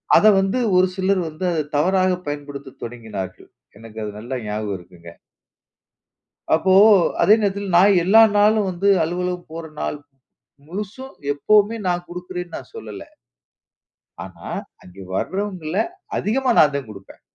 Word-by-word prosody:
அதை 215 - +7
வந்து 195 +6 0 0.2
ஒரு 185 +1 +5
சிலர் 190 0 +1
வந்து, 155 +4 -8
அதை 160 -2 0
தவறாக 185 +4 +2 0.2
பயன்படுத்த 145 -2 -7
தொடங்கினார்கள். 110 -5 -7 0.3
எனக்கு 110 -1 -10
அது 105 - -4
நல்லா 120 +4 -5
ஞாபகம் 105 -1 -3
இருக்குங்க. 85 -1 -15 1.4
அப்போ 185 +4 +3 0.5
அதே 210 - +6
நேரத்தில 200 -1 -2
நான் 195 +2 +6
எல்லா 220 +5 +6 0.2
நாளும் 210 -1 +3
வந்து, 185 +2 0
அலுவலகம் 180 +1 -3
போற 165 +1 -6 0.2
நாள் - - -3 0.7
முழுசும் 210 +9 -7 0.2
எப்பவுமே 210 +8 +3
நான் 175 0 -1
குடுக்கிறேன்னு, 180 -1 -7
நான் 130 - -12
சொல்லல. 105 -2 -8 1.2
ஆனா, - - -10 0.3
அங்கு 90 +2 -13
வரவங்கள்ல 185 - -3 0.4
அதிகமா 255 +5 0
நான் 145 -2 +5
தான் 140 -5 -4
குடுப்பேன். 100 -2 -13
175 Hz, 130 wpm, -21 LUFS, 130-195 Hz, 1.4 s, அதை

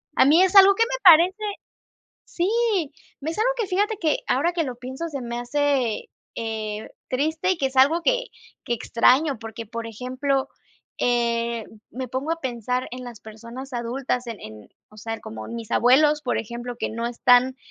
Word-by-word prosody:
a - - +5
mí 320 +7 +6
es 380 +1 +1
algo 390 0 +9
¿que 455 - +3
me - - -4
parece? 350 0 +8 0.9
Sí, 350 +2 -2 0.7
me 300 +3 -3
es 330 - -6
algo 460 +3 +3
que 445 - 0
fíjate 410 +4 0
que 310 -3 +1
ahora 310 +7 +1
que 340 -2 -1
lo 255 -4 -5
pienso 260 +7 -6
se 285 -4 -5
me 240 -1 -5
hace, 260 -2 0 0.3
eh, 220 -1 -4 0.2
triste 315 +7 0
y 375 - +1
que 275 - +1
es 265 0 -6
algo 285 +6 +5
que - - +1 0.4
que - - -2
extraño, 255 +4 +2
porque, 225 0 -8
por 230 +1 -6
ejemplo, 255 +4 -2 0.5
eh, 235 -1 0 0.3
me 255 +1 -6
pongo 260 +6 -3
a 330 0 -2
pensar 250 0 -2
en 250 +1 -7
las 240 -3 -10
personas 235 +5 -10
adultas, 245 +1 -2
en 230 -3 -6
en, 105 -1 -11 0.2
o 215 - -17
sea, 225 +1 -4
en - - -9
como 220 0 -8
mis 230 -2 -7
abuelos, 295 +5 +4
por 250 - -1
ejemplo, 240 +2 -6
que - - -2
no 230 +1 -3
están 245 +2 +3
255 Hz, 185 wpm, -23 LUFS, 235-310 Hz, 0.9 s, algo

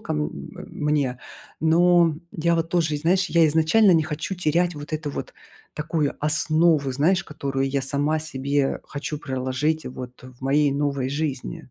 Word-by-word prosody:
ко, - - -4
м, 75 0 -1 0.3
э, - - -8
мне. 145 -4 -1 0.4
Но, 170 0 +4 0.2
я 170 +1 +1
вот 165 0 -1
тоже, 165 -3 +1
и 145 - -1
знаешь, 185 +5 +2
я 165 -2 +4
изначально 160 +7 +4
не 165 -2 +4
хочу 155 +5 -4
терять, 175 +1 +1
вот 145 +1 -9
эту 155 -1 -3
вот, - - -6 0.4
такую 155 -1 -1
основу, 155 -1 +2
знаешь, 175 +8 +2
которую 135 -2 -2
я 140 0 0
сама 145 +3 0
себе 140 -2 -1
хочу 150 +1 -5
проложить, 135 +3 -2
вот, 125 0 -9
э, - - -10
в 125 - -25
моей 140 +1 +2
новой 140 -2 -1
жизни. 140 -4 -4
150 Hz, 170 wpm, -23 LUFS, 140-160 Hz, 0.4 s, Но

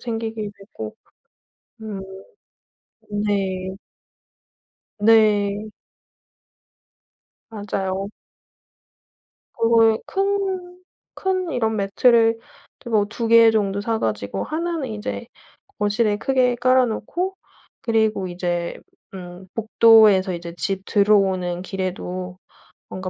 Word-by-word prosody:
생기게 225 -2 -4
되고 195 - -9 0.9
음. 210 -3 -6 1.2
네. 190 -2 -2 1.3
네. 210 -1 +3 1.8
맞아요. 195 -2 -3 1.5
그거에 225 -1 +4
큰 385 -2 -2 0.4
큰 370 -2 -1
이런 220 -2 0
매트를 225 +3 +3 0.4
이제 - - -10
뭐 215 -3 +3
2 225 +2 -4
개 230 0 +7
정도 200 -2 0
사 225 +1 -1
가지고 105 -2 -2
1 335 +2 -2
는 275 -5 -3
인제 215 +2 -5 0.5
거실에 210 +1 +1
크게 255 +1 +1
깔아 255 +1 +3
놓고 350 - -3 0.5
그리고 220 -4 +1
이제 175 -1 -3 0.4
음 180 0 -9
복도에서 220 -4 +5
이제 170 0 -7
집 195 0 -1
들어오는 190 -4 +2
길에도 185 -1 -5 0.5
뭔가 185 0 -5
210 Hz, 170 characters per minute, -22 LUFS, 190-230 Hz, 1.8 s, 개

